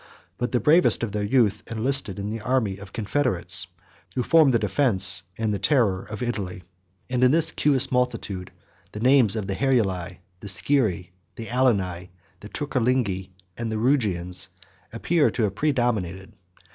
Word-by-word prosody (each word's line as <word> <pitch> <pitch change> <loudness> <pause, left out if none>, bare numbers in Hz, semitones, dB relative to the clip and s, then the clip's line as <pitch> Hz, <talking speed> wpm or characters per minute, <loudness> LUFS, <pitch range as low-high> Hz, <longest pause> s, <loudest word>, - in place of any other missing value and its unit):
But 120 +1 -2
the 125 - +1
bravest 155 - +4
of 115 - -2
their 105 +1 -3
youth 105 -1 +1
enlisted 115 -2 -1
in 100 +1 -4
the 115 0 -5
army 110 -5 -1
of 100 0 -11
confederates, 110 -4 -1 0.5
who 125 - 0
formed 160 -2 +4
the 120 - +3
defence 95 - +3 0.2
and 110 -2 -1
the 100 - -3
terror 100 -4 +1
of 105 +3 -7
Italy; 100 -7 -4 0.5
117 - - -8
and 125 - +1
in 125 - +6
this 160 +3 +4
promiscuous 135 -2 +2
multitude, 105 -7 -2 0.4
the 105 - -6
names 125 -3 +4
of 110 -3 -3
the 95 - -3
Heruli, 95 -9 -1 0.2
the 100 - -9
Scyrri, 95 -5 0 0.2
the 115 - -7
Alani, 95 -8 0 0.3
the 105 - -11
Turcilingi, 125 -9 -1 0.3
and 115 -1 -4
the 110 - -2
Rugians, 100 -8 0 0.4
appear 150 +7 +1
to 120 - -2
have 100 -3 0
predominated. 110 - -1
110 Hz, 160 wpm, -24 LUFS, 95-130 Hz, 0.5 s, in